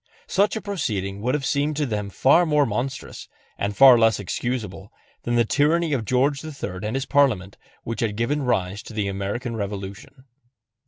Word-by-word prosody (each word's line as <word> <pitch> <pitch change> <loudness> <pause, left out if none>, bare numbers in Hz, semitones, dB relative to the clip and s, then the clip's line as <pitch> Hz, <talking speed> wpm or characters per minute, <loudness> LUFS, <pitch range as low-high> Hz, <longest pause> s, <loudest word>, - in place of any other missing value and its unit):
Such 200 +2 +1
a 220 - -3
proceeding 105 - -3
would 125 +5 0
have 140 -2 -2
seemed 145 +3 0
to 150 - +1
them 105 -5 -3
far 135 - +4
more 150 -3 +3
monstrous, 125 +4 -4 0.3
and 100 0 -3
far 130 -3 +8
less 115 -1 +3
excusable, 105 -1 -4 0.3
than 120 - -2
that 120 -2 +2
tyranny 155 +2 +2
of 120 -5 -1
George 135 +5 +1
III 140 -12 -6
and 105 +3 -3
his 135 0 -1
Parliament 130 -10 +2 0.3
which 115 -1 -5
had 110 -3 -1
given 120 +7 0
rise 100 -6 -1
to - - -11
the 105 -2 -1
American 100 +5 -3
Revolution. 100 +5 -7
120 Hz, 175 wpm, -23 LUFS, 100-140 Hz, 0.3 s, far